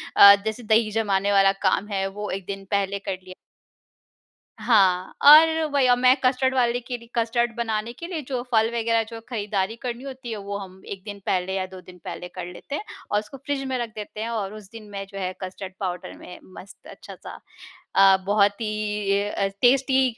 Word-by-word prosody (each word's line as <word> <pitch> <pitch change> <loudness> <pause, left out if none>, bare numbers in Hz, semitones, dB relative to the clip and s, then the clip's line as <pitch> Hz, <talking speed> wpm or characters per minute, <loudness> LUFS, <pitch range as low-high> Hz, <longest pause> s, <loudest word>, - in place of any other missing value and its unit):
अ, 200 0 +10
जैसे 220 +3 -3
दही 220 0 +4
जमाने 205 -2 +1
वाला 195 -1 +5 0.2
काम 200 +2 +1
है, 195 -2 -1
वो 210 +2 -6
1 190 -1 -5
दिन 195 0 -6
पहले 200 0 0
कर 195 -1 -4
लिया। 185 0 -11 1.3
हाँ 190 -6 +3
और 320 +2 +8
वही 275 -3 +3
अब 245 - +5
मैं 255 +1 +5
कस्टर्ड 260 +1 +2
वाले 245 -1 +2
के 245 0 -6
लिए 235 0 -17
कस्टर्ड 235 +1 +1
बनाने 225 -1 -2
के 335 +7 -8
लिए 345 -4 -4
जो 255 -3 -2
फल 220 -1 +4
वगैरह 230 -1 +1
जो 230 +1 -11
है 225 - -8
खरीदारी 205 -2 -2
करनी 245 +1 -5
होती 260 -3 -8
है, 215 - -3
वो 200 0 -5
हम 190 -1 -10
1 195 -1 -8
दिन 205 -1 -8
पहले 185 0 0
या 190 -1 -1
2 185 0 -11
दिन 180 0 -15
पहले 180 - -6
कर 175 0 -7
लेते 180 +10 -7
हैं 295 - -4 0.3
और 205 - +3
उसको 215 +6 -10
फ्रिज 275 0 -3
में 260 - -1
रख 235 - -3
देते 210 0 -8
हैं। 230 - -3
और 210 -3 -3
उस 210 -3 -11
दिन 220 -2 -11
मैं 195 -1 -6
जो 195 0 -10
है 185 -1 -2
कस्टर्ड 185 0 -7
पाउडर 180 -2 -4
में 180 - -11 0.2
मस्त 195 - -14
अच्छा-सा - - -11 0.6
अ, 195 0 +7
बहुत 205 +1 +2
ही 220 - -1 0.4
ए 200 +1 +1
अ, 200 - -1
टेस्टी 265 0 +4
210 Hz, 210 wpm, -24 LUFS, 195-240 Hz, 1.3 s, अ